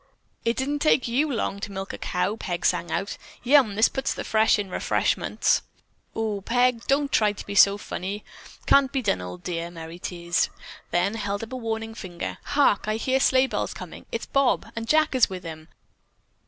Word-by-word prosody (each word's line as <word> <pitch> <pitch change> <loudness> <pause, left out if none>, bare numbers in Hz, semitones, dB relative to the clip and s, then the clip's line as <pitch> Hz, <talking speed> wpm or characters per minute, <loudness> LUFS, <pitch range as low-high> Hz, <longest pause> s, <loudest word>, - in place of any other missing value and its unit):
"It 230 +1 0
didn't 285 +2 -1
take 290 -4 +3
you 280 +6 +1
long 220 -4 -2
to 200 - -5
milk 195 0 -5
a - - -5
cow," 180 +4 -1
Peg 175 -5 -4
sang 170 - +1
out 195 - -3 0.2
"Yum, 250 -5 +5
this 220 +3 +5
puts 270 - -2
the - - -4
fresh 220 0 +3
into 205 -2 -3
the - - -9
refreshments." - - +1 0.5
"Oh 220 -2 -1
oo, - - -8
Peg, 245 +2 +1
don't 280 0 +2
try 210 -2 +3
to 200 - -9
be 200 - -5
funny. 200 0 +2 0.4
Can't 275 -1 +5
be 270 -3 -1
done, 95 - +1
old 90 0 -8
dear," 170 -1 -3
Merry 165 0 -9
teased, 175 -1 -1 0.4
then 175 +4 +1
held 205 -2 -3
up 225 +3 -8
a - - -2
warning 225 -2 -3
finger. 180 -6 -6
"Hark! 280 -9 +2
I 215 - +1
hear 260 +4 +1
sleigh 260 0 +4
bells - - -3
coming. - - -9
It's - - -3
Bob, 275 -2 +1
and 225 0 -4
Jack 310 -1 +4
is 255 -2 +4
with 185 -1 -6
him. 160 -1 -8
215 Hz, 195 wpm, -25 LUFS, 185-255 Hz, 0.5 s, Yum